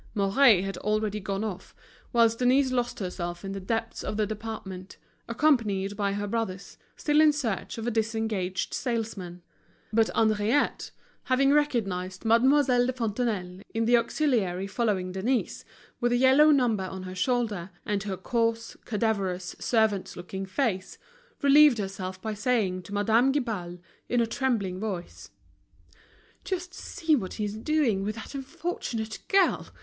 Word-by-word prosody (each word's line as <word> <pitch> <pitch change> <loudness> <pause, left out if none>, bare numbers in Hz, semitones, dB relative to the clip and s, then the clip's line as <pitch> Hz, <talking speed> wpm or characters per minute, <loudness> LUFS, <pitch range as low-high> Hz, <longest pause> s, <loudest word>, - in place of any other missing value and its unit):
Mouret 200 0 +5
had 195 0 -4
already 215 0 -1
gone 195 +1 -3
off, 195 -4 -6 0.4
whilst 230 -1 +3
Denise 255 +2 +3
lost 245 -1 -1
herself 175 -1 -5
in 195 - -4
the 195 - -4
depths 225 +4 -3
of 210 - -3
the 215 - +2
department, 205 -3 -7 0.3
accompanied 220 -7 +1
by 200 -1 0
her 205 0 -2
brothers, 200 -3 -4 0.2
still 300 0 +3
in 310 -1 +6
search 250 -10 -3
of 225 - -5
a 240 - 0
disengaged 220 -5 -1
salesman. 215 -8 -3 0.5
But 225 0 +3
Henriette 220 +4 +1 0.4
having 270 +1 +3
recognized 195 -10 0
Mademoiselle 250 +2 +4
de 255 - -1
Fontenailles, 215 -6 -2
in 225 0 +1
the 240 +1 +5
auxiliary 230 - +1
following 195 -3 -1
Denise, 225 +7 -1 0.4
with 240 -1 +1
a 245 - +3
yellow 265 +4 +6
number 240 -9 +3
on 185 0 -6
her 185 0 -7
shoulder, 210 -3 -1 0.2
and 205 -1 -1
her 195 -2 -4
coarse, 230 +3 -1
cadaverous, 200 -5 -1
servant's 220 -4 +1
looking 190 +2 -6
face, 190 -3 -2 0.5
relieved 285 -2 +7
herself 190 -2 -5
by 220 +2 -4
saying 210 -5 0
to 180 - -13
Madame 225 +5 +3
Guibal, 215 -11 -3 0.3
in 245 - +2
a 235 - +3
trembling 225 -7 -1
voice: 190 -5 -5 1.1
"Just 365 -1 -4
see 320 -4 0
what 195 -9 -3
he's 210 -2 -3
doing 230 -3 +1
with 210 +1 -2
that 220 - -9
unfortunate 270 -6 -4
girl. 390 -1 +3
220 Hz, 145 wpm, -27 LUFS, 195-245 Hz, 1.1 s, relieved